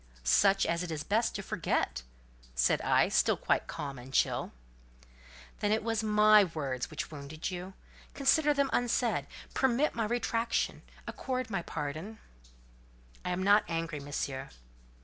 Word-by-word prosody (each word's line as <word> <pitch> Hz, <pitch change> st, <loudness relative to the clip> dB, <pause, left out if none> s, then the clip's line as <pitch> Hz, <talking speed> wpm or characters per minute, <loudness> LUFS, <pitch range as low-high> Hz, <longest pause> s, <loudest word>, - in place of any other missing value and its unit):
"Such 195 Hz, -, +4 dB
as 170 Hz, +1 st, 0 dB
it 180 Hz, -, -4 dB
is 155 Hz, -2 st, -3 dB
best 225 Hz, +3 st, +1 dB
to -, -, -4 dB
forget!" 65 Hz, -3 st, -1 dB, 0.5 s
said -, -, +2 dB
I, -, -, +3 dB
still -, -, +2 dB
quite -, -, 0 dB
calm 140 Hz, -5 st, -5 dB
and 125 Hz, +2 st, -11 dB
chill. -, -, +1 dB, 1.1 s
"Then 205 Hz, -, 0 dB
it 220 Hz, 0 st, +1 dB
was 225 Hz, -1 st, 0 dB
my 210 Hz, -1 st, +6 dB
words 135 Hz, -5 st, -3 dB
which 155 Hz, 0 st, -5 dB
wounded 150 Hz, +4 st, -6 dB
you? 180 Hz, +1 st, -6 dB, 0.4 s
Consider 295 Hz, +2 st, +3 dB
them 280 Hz, -1 st, +1 dB
unsaid: 235 Hz, -, +1 dB, 0.3 s
permit 265 Hz, +3 st, +2 dB
my 225 Hz, -2 st, -1 dB
retractation; 230 Hz, 0 st, -1 dB, 0.2 s
accord 255 Hz, -3 st, -4 dB
my 195 Hz, -3 st, -1 dB
pardon." 160 Hz, +7 st, -5 dB, 1.1 s
"I -, -, -3 dB
am 180 Hz, +1 st, -1 dB
not 205 Hz, +2 st, +5 dB
angry, 165 Hz, -2 st, -3 dB
Monsieur." 140 Hz, -2 st, -4 dB
190 Hz, 145 wpm, -31 LUFS, 150-225 Hz, 1.1 s, my